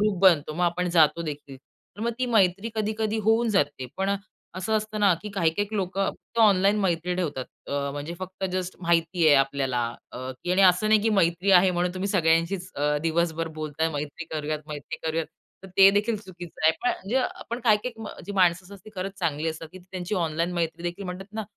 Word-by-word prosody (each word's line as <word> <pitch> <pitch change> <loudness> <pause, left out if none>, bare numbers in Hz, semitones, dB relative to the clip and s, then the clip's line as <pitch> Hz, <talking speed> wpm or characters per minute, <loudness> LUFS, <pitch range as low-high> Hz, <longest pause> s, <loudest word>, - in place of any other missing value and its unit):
Group 210 -3 +1
बनतो. 160 -5 +5
मग 175 +3 0
आपण 180 +1 0
जातो 155 +2 +4
देखील. 145 -3 -7
तर 140 +8 -20
मग 235 +2 0
ती 255 - 0
मैत्री 200 -2 +2
कधी-कधी 220 0 -1
होऊन 230 +1 +3
जाते. 145 -9 0
पण 195 +1 +1 0.4
असं 185 +4 -3
असतं 215 0 -3
ना, 200 -3 +5
की 210 - -5
काही 175 -5 +1
काही 205 +3 -2
लोकं 195 0 -1
फक्त 235 - -12
ऑनलाईन 200 -1 +5
मैत्री 180 -1 0
ठेवतात. 150 -8 -2 0.2
अ, 140 0 -2
म्हणजे 145 +4 -5
फक्त 190 +1 -6
जस्ट 185 0 -3
माहिती 170 0 +2
आहे 150 - +7
आपल्याला, 135 -2 +1 0.3
अ, - - -7 0.3
की 180 - -2
आणि 195 +2 +4
असं 185 +3 +5
नाही 215 -1 +5
की 225 - +2
मैत्री 175 +2 +2
आहे 185 0 +6
म्हणून 180 0 0
तुम्ही 190 +2 -2
सगळ्यांशीच 170 +1 +1
अ, 150 +1 +1
दिवसभर 165 0 0
बोलताय, 155 +1 -1
मैत्री 145 +3 -5
करूयात, 155 -1 -3
मैत्री 145 -1 -6
करूयात. 160 0 -1 0.4
तर 190 - -10
ते 195 0 +9
देखील 210 +3 +1
चुकीचं 175 -6 -9
आहे. 160 - +6
पण 245 - +2
म्हणजे, 245 +7 -1 0.3
पण 235 +2 -3
काही 215 -3 +6
काही 230 -3 -5
अ, - - -10
जी 205 - -5
माणसं 180 -2 +3
असतात 200 +2 -12
ती 215 - -11
खरंच 190 +2 -5
चांगली 160 -2 -1
असतात. 160 0 -6
की 185 - -10
त्यांची 185 +1 -5
ऑनलाईन 170 -1 -1
मैत्रीदेखील 175 +2 -3
म्हणतात 190 +3 -7
ना 220 - -2
180 Hz, 205 wpm, -26 LUFS, 160-200 Hz, 0.4 s, ते